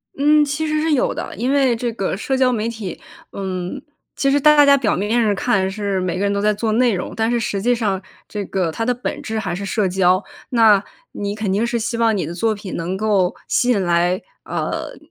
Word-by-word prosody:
嗯， 300 +2 +4
其 290 +2 -2
实 305 0 0
是 320 0 +1
有 265 - +1
的， - - -6
因 245 +4 -1
为 270 -4 +3
这 235 +1 -2
个 195 -4 -2
社 265 +6 -1
交 260 -1 +3
媒 220 -1 -1
体， 215 -7 -6 0.3
嗯， 190 +5 -4 0.3
其 275 - +1
实 285 - +3
大 295 0 +6
家 280 0 +7
表 235 -6 +1
面 215 +5 +1
上 210 -3 +2
看， 195 -3 +1
是 200 -1 -2
每 180 -2 -2
个 - - -3
人 200 0 +1
都 200 - 0
在 210 +1 +3
做 215 +2 -1
内 240 0 +3
容， 180 - -4
但 225 0 0
是 240 0 +1
实 205 -3 -2
际 245 +3 +2
上 200 -5 -1 0.3
这 205 -1 -4
个 185 -4 -1
它 225 - -3
的 250 - +2
本 245 - -5
质 220 - -4
还 195 -4 -3
是 200 +2 -5
社 200 +1 0
交。 185 +1 +2 0.3
那， 220 -5 +5 0.3
你 205 0 -4
肯 215 -3 -2
定 210 +4 +1
是 235 - -1
希 230 +1 -2
望 230 -1 +2
你 180 - -1
的 165 - -5
作 215 +5 0
品 200 -2 -7
能 170 +3 -3
够 200 -3 +1
吸 250 - +1
引 220 -5 +3
来， 175 +1 +1 0.2
呃， - - -4
215 Hz, 255 characters per minute, -20 LUFS, 190-245 Hz, 0.3 s, 家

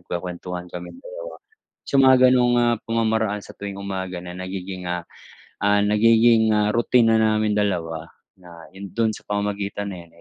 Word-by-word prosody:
nagkuwekuwentuhan 90 0 -6
kaming 90 - -8
dalawa. - - -8 0.5
Sa 140 - 0
mga 130 0 +7
ganung, 125 -1 +3
ah, 120 -1 +2
pamamaraan 110 -2 0
sa - - -12
tuwing 100 -1 -6
umaga 95 -2 -5
na 90 0 -8
nagiging, 95 0 -6
ah, 90 -1 -3 0.6
ah, 100 0 +3
nagiging, 110 +1 +4
ah, 105 0 +2
routine 115 -1 +3
naming 110 -1 +2
dalawa 85 -6 -1 0.3
na, 85 -2 -13
yun 100 -1 -9
dun 115 -1 +1
sa - - -13
pamamagitan 100 0 -3
na 85 -1 -10
yan, - - -25
105 Hz, 160 wpm, -22 LUFS, 90-115 Hz, 0.6 s, mga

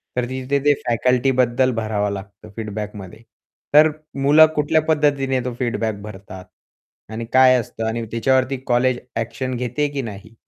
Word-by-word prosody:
तर 125 - 0
तिथे 130 +2 -1
ते 145 - +6
फॅकल्टीबद्दल 125 +1 +2
भरावं 105 -2 -1
लागतं 100 +2 -10
फीडबॅकमध्ये. 105 -2 -7 0.5
तर 155 +1 +7 0.3
मुलं 150 +3 +7
कुठल्या 150 +1 +2
पद्धतीने 140 -4 +1
तो 125 - -3
फीडबॅक 110 -4 -2
भरतात 95 -3 -10 0.7
आणि 115 +1 -5
काय 130 0 +6
असतं 115 0 -5
आणि 115 +1 -3
त्याच्यावरती 130 +3 +1
कॉलेज 125 +1 +2 0.2
ॲक्शन 130 +3 -3
घेते 125 +4 -1
की 140 - -2
नाही? 110 -1 -9
125 Hz, 135 wpm, -20 LUFS, 110-135 Hz, 0.7 s, तर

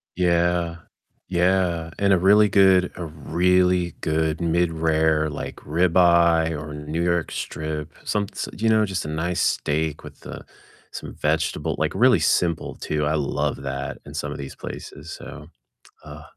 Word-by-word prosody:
Yeah, 85 -1 +1 0.5
yeah, 90 -2 +1
and 100 -1 +3
a 90 - +3
really 105 +3 +5
good 95 -2 +4
a 90 - -6
really 90 +3 +1
good 80 +1 0
mid-rare, 80 -2 +1
like, 75 - -6
ribeye 85 0 +3
or 75 0 -7
New 75 +3 -3
York 85 -1 0
strip, 75 0 -5
some 100 -1 -1
s - - -5
you 110 +1 0
know, 110 -1 +4
just 95 -5 -3
a - - -4
nice 80 +3 -2
steak 75 0 -1
with, - - -13
uh, - - -7 0.5
some - - -8
vegetable 75 +1 -1
like, - - -1
really 125 -6 +5
simple 85 +1 0
too, 75 -1 -2
I 75 - +1
love 75 -2 -1
that 65 -1 -4
in - - -10
some - - -4
of - - -6
these 70 -1 -8
places, 75 +4 -9
so, - - -9 0.6
uh 75 0 -10
85 Hz, 155 wpm, -23 LUFS, 80-90 Hz, 0.6 s, really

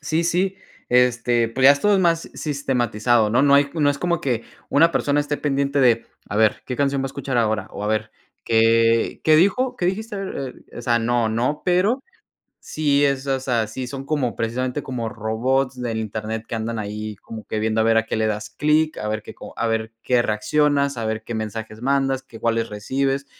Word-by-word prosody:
Sí, 160 +3 -1
sí, 185 +3 0 0.3
este, 120 -1 +3
pues, 130 +3 -1
ya 135 - +10
esto 205 +9 +2
es 195 - +4
más 170 -2 +1
sistematizado. 120 -6 +1
No 125 +4 +3
no 140 -1 +5
hay 140 0 +4
no 145 -3 +3
es 140 - -3
como 175 -1 0
que, 120 -4 -1 0.2
una 165 +3 +4
persona 145 0 +1
esté 145 0 -2
pendiente 140 -1 0
de, 120 -3 +3 0.2
a 105 - -3
ver, 110 -1 +2
¿qué 125 - -4
canción 140 0 +1
va 135 - -1
a - - -4
escuchar 135 -1 -4
ahora?, 110 -2 0
o 100 - -7
a - - -1
ver, 110 0 -1 0.3
¿qué 115 0 +3
qué 155 -1 +6
dijo? 250 +9 +2
¿Qué 175 - -1
dijiste? 215 +4 -2
A - - -4
ver, 140 -9 -5 0.2
eh, - - -10
o - - -6
sea, 120 0 +2
no, 115 0 +1
no, 125 +7 -1
pero 195 +9 +2 0.6
sí 145 -2 +1
es, 140 0 -1
o 135 -1 +1
sea, 120 -4 0
sí 125 +3 -6
son 135 +1 -6
como 140 -6 -1
precisamente, 125 +4 -2
como 125 -4 -4
robots 125 +4 -1
del 115 -2 -2
internet 110 +1 -4
que 115 - -4
andan 115 0 -3
ahí 105 0 -5
como 110 -1 -10
que 110 - -2
viendo 110 0 0
a - - +2
ver 115 0 +4
a 115 - +2
qué 110 - -2
le 110 - +1
das 105 0 -3
clic, 155 +1 +1
a 105 - -4
ver 110 0 -2
qué - - -10
co - - -11
a 115 - 0
ver 115 0 -2
qué 125 -1 +3
reaccionas, 140 +5 +1
a 115 - -3
ver 110 0 -2
qué 120 - -6
mensajes 110 0 -5
mandas, 135 0 +1
que 115 -4 -13
cuáles 115 0 0
recibes. 135 +6 -1
125 Hz, 220 wpm, -22 LUFS, 115-145 Hz, 0.6 s, ya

